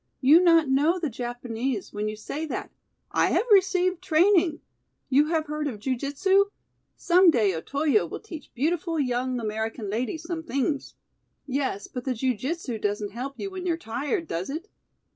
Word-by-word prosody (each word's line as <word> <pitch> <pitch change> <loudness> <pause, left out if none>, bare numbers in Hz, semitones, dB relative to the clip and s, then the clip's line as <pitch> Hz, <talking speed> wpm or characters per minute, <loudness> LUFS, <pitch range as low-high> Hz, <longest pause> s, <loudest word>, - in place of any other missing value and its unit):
"You 295 +6 +7
not 330 -3 +5
know 290 +7 +3
the 320 -6 -2
Japanese 240 -1 -4
when 210 0 -2
you 215 - -5
say 290 +9 -5
that. - - -5 0.4
I - - +3
have - - +1
received 370 -2 +4
training. 350 -2 +3 0.5
You 285 +3 +4
have 320 -1 0
heard 300 0 -3
of 245 -7 -4
jiu 255 +5 -1
jitsu? 380 +10 +2 0.5
Some 360 +1 +5
day 220 - +3
Otoyo 285 - +1
will - - -6
teach 330 -9 -10
beautiful 325 +4 0
young 250 -1 0
American 220 -1 -3
lady 240 +7 -2
some 330 +1 -5
things." 280 -2 -2 0.5
"Yes, 265 -7 -2
but 250 - -6
the 260 -2 -1
jiu 255 +2 0
jitsu 260 - -4
doesn't 205 0 -2
help 260 +5 -5
you 395 - -4
when 370 -1 -5
you're 335 -2 +1
tired, 295 - -3
does 175 - -3
it?" 320 +8 -5
280 Hz, 170 wpm, -26 LUFS, 240-335 Hz, 0.5 s, You